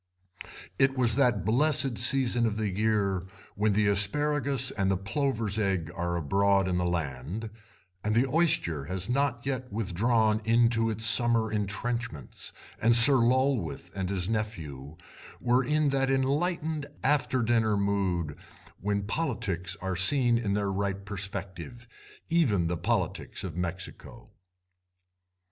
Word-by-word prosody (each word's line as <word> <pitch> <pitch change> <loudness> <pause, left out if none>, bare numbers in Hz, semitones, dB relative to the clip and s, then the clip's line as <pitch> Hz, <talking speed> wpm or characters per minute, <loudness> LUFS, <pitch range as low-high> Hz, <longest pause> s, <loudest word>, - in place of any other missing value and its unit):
It 135 0 +3
was 120 -3 +3
that 120 -7 +1
blessed 135 +1 +3
season 120 -1 +4
of 105 -1 -3
the 105 -2 -1
year 100 -4 0 0.3
when 105 0 +1
the 105 +1 +2
asparagus 140 +7 +2
and 95 0 -1
the 95 - +1
plover's 110 +1 -1
egg 95 -6 -1
are 85 0 -2
abroad 95 +4 +1
in 90 -1 0
the 90 - 0
land, 85 - -4 0.5
and 105 +1 0
the 120 +3 +3
oyster 135 - +1
has 90 +3 -2
not 130 -2 -1
yet 130 -3 -4
withdrawn 110 +2 +1
into 115 0 +2
it's 110 0 -1
summer 110 0 +4
entrenchments, 105 - -4 0.3
and 115 +1 +4
Sir 130 +4 +8
Lulworth 120 -8 0
and 95 -1 -3
his 95 -3 -2
nephew 80 -10 -5 0.4
were 125 +1 +2
in 150 +2 +1
that 135 -1 0
enlightened 150 +3 -1 0.2
after 135 -3 +1
dinner 110 -2 +1
mood 95 -6 -1 0.4
when 100 +1 -1
politics 105 - -2
are 95 -1 -2
seen 120 +5 +2
in 100 -4 -1
their 100 -1 -1
right 100 0 -3
perspective, 100 +3 -6 0.4
even 130 - +2
the 85 +1 -1
politics - - -2
of 90 -5 -6
Mexico. 90 +1 -6
110 Hz, 135 wpm, -28 LUFS, 95-125 Hz, 0.5 s, Sir